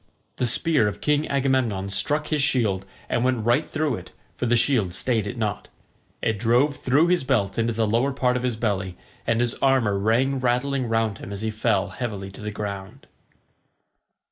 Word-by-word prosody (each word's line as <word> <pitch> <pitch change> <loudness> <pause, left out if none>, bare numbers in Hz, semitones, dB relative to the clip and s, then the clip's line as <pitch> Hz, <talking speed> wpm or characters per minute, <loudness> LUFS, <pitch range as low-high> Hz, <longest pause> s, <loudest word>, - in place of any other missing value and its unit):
The 125 - +1
spear 140 -1 +3
of 105 - -4
King 150 0 +1
Agamemnon 130 -8 0
struck 150 +10 0
his 150 -2 +1
shield 105 -8 +1 0.2
and 120 - 0
went 125 -4 0
right 120 +6 +2
through 155 -5 -1
it, - - -10 0.3
for 125 - -2
the 120 +1 +3
shield 115 -7 +1
stayed 115 -3 0
it 125 - -5
not. 105 -3 -2 0.6
It 110 -3 0
drove 125 +6 +2
through 145 +7 +3
his 180 -5 +2
belt 115 -7 0
into 115 +1 +1
the 115 0 0
lower 115 +6 +1
part 125 -2 +1
of 125 - -1
his 125 -2 -1
belly, 100 -5 -2 0.3
and 115 0 +2
his 120 0 +1
armour 125 -7 +3
rang 125 +6 +2
rattling 130 +1 0
round 115 -2 0
him - - -8
as 100 0 -5
he 110 - -1
fell 105 -2 0
heavily 100 -2 -5
to 95 - -12
the 105 - -4
ground. 100 -2 -6
115 Hz, 190 wpm, -24 LUFS, 105-130 Hz, 0.6 s, spear